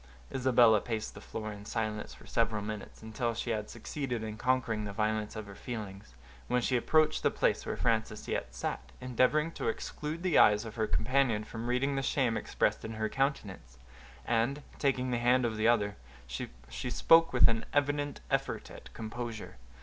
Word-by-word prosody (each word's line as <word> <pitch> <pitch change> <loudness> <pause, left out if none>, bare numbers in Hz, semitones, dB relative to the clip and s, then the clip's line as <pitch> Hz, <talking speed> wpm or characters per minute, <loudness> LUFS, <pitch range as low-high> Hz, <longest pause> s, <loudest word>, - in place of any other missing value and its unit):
Isabella 120 -5 +5
paced 110 -3 -3
the - - -11
floor 110 -1 -5
in 100 0 -10
silence 110 0 -3
for - - -16
several 115 -3 0
minutes, 105 +1 -7
until 115 +1 -2
she 120 - -2
had 105 -1 -2
succeeded 130 -6 -4
in 110 -1 -4
conquering 115 -2 0
the 105 - -4
violence 105 0 -1
of 110 -1 -5
her 100 - -10
feelings, 100 - -7 0.3
when 125 - +2
she 130 - +1
approached 155 +5 +3
the - - +3
place - - 0
where - - -2
Frances 110 -2 0
yet - - -3
sat, - - -4
endeavoring 130 +6 +2
to - - -4
exclude 150 +8 -4
the 185 -4 +4
eyes 105 +1 +6
of 110 - -7
her 110 -2 -1
companion 120 -2 +2
from 115 +2 -6
reading 130 +3 +1
the - - +1
shame 130 -4 +1
expressed - - 0
in 110 - -5
her 110 0 -2
countenance, 105 - -2 0.5
and, 120 +5 +1 0.2
taking 130 -3 +1
the 120 - +1
hand 125 +1 +3
of 115 -2 -1
the 110 +1 +2
other, 105 -3 +2 0.3
she 60 - -6
spoke 165 +6 +5
with 125 - +6
an 115 -1 0
evident 145 0 0
effort - - -1
at - - -12
composure. 115 - -6
115 Hz, 180 wpm, -31 LUFS, 105-130 Hz, 0.5 s, eyes